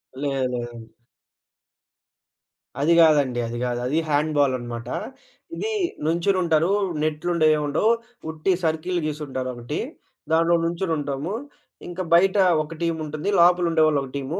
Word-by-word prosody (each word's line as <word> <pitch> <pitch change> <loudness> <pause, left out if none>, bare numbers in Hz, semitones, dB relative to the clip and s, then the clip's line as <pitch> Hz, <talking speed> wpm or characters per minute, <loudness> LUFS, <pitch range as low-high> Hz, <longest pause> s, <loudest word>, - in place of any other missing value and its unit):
లేదు. 140 +1 -2 0.3
లేదండి. 120 -2 -7 1.9
అది 165 +3 +4
గాదండి. 145 -6 +4
అది 120 +1 -5
గాదు. 120 -1 -1
అది 155 +5 +1
హ్యాండ్ 150 +1 +1
బాల్ 140 -2 +3
అనమాట. 120 -1 -7 0.7
ఇదీ 440 +1 -3 0.3
నుంచునుంటారూ, 170 0 +2 0.3
నెట్లుండవు, 155 +1 +1
ఏముండవు, 150 +10 +1 0.4
ఉట్టి 160 +4 -1
సర్కిల్ 160 +3 -1
గీసుంటారు 140 -4 -4
ఒకటి, 120 0 -5 0.5
దాంట్లో 165 +1 +4
నుంచొనుంటాము, 165 -2 -2 0.5
ఇంకా 180 +1 -4
బయట 190 +3 +5 0.3
ఒక 165 +2 -9
టీముంటుంది, 160 +1 -2
లోపల 175 0 +5
ఉండేవాళ్ళు 155 -3 +3
ఒక 135 - -8
టీము. 145 +8 -4
155 Hz, 115 wpm, -23 LUFS, 140-170 Hz, 1.9 s, బయట